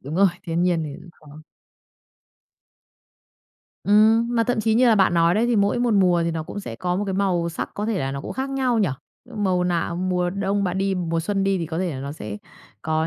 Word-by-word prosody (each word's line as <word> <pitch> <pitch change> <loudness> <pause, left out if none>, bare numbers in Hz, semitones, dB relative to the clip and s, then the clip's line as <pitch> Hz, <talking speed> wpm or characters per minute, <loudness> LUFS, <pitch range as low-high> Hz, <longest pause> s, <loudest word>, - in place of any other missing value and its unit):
Đúng 145 +4 -7
rồi, 195 +1 +5
thiên 170 -2 -1
nhiên 175 -3 +1
thì 145 - -6
cũng 175 - -14 0.2
khó. 155 +2 -13 2.4
Ừm, 220 +3 +4
mà 230 -1 +2
thậm 245 -2 0
chí 220 0 +1
như 250 +2 +4
là 225 - +5
bạn 190 -3 +3
nói 170 +1 +3
đấy 230 +3 +2
thì 240 -2 +1
mỗi 200 +4 +2
một 240 -3 +1
mùa 180 -3 +3
thì 165 - 0
nó 160 -1 -3
cũng 205 - -7
sẽ 115 -10 -7
có 180 +3 -1
một 205 - -1
cái 195 - -3
màu 180 -3 0
sắc 165 - -5
có 210 +1 -3
thể 225 -3 -1
là 135 0 -2
nó 140 - -4
cũng - - -6
khác 265 +1 -3
nhau 260 -4 0
nhỉ? 200 -6 +2 0.5
Màu 185 -4 0
nào, 170 -1 -1
mùa 180 -1 0
đông 200 +1 -1
bạn 185 +1 -1
đi, 195 0 0
mùa 165 -2 -1
xuân 195 +2 -1
đi 195 -1 +1
thì 165 - -3
có 160 +1 -4
thể 185 -2 -1
là 130 - -6
nó 140 +1 -5
sẽ 105 -9 -7 0.5
có 160 0 0
185 Hz, 245 wpm, -23 LUFS, 165-205 Hz, 2.4 s, rồi